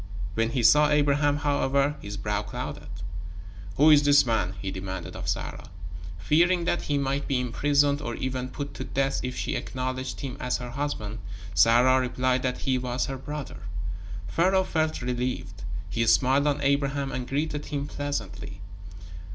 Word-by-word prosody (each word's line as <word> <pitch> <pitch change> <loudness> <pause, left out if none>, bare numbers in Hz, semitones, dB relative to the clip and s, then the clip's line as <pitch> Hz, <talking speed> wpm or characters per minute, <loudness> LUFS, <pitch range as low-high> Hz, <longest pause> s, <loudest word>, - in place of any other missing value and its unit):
When 115 +3 +1
he 120 0 -1
saw 150 +6 +6
Abraham, 145 0 +3
however, 140 -1 +1
his 100 0 -6
brow 105 0 -1
clouded. - - -6 0.9
"Who 155 +3 +7
is 145 -1 +8
this 145 -1 +5
man?" 105 -5 0
he 95 -1 -3
demanded 95 -1 -5
of - - -6
Sarah. - - -3 0.5
Fearing 170 - +3
that 175 - +1
he 145 - -1
might 140 0 -1
be 135 -2 +1
imprisoned, 140 +3 +2
or 120 - -3
even 130 -1 -3
put 145 +1 -6
to - - -5
death 135 0 0
if 125 0 -3
she - - -2
acknowledged 130 0 -3
him 135 -2 -5
as 125 0 0
her 120 -1 -6
husband, 120 -6 -3 0.3
Sarah 120 +7 +5
replied 130 0 +1
that 130 -1 -2
he 130 -1 +1
was 125 0 -1
her 135 - -4
brother. 145 +1 -6 0.7
Pharaoh 185 - +3
felt 160 -6 -1
relieved. 120 -7 -3 0.3
He 115 +3 0
smiled 135 +4 +4
on 145 0 +1
Abraham 140 0 +1
and 125 -1 -4
greeted 150 +1 -2
him 140 -1 -2
pleasantly. 130 -10 -4
135 Hz, 160 wpm, -27 LUFS, 120-145 Hz, 0.9 s, is